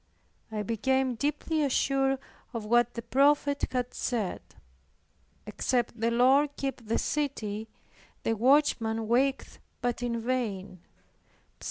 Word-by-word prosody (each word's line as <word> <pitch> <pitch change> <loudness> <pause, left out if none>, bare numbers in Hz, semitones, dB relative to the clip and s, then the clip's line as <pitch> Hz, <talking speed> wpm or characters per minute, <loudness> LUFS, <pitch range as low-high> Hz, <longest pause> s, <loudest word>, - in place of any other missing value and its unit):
I 210 -1 -2
became 260 +4 +1
deeply 300 +5 -1
assured 270 -1 +2 0.4
of 230 -3 -4
what 240 +2 +3
the 235 - -5
prophet 285 +3 +3
had 250 -1 -2
said, 220 -7 -2 1.0
"Except 240 -2 -1
the 230 +1 +2
Lord 270 +5 +4
keep 270 -3 -3
the 225 - +1
city, 225 -8 -2 0.5
the 225 - +1
watchman 225 -3 +2
waketh 265 +4 +1 0.2
but 245 -1 -2
in 235 -1 -1
vain" 225 -6 -2
(Ps. - - -34
245 Hz, 120 wpm, -29 LUFS, 225-270 Hz, 1.0 s, Lord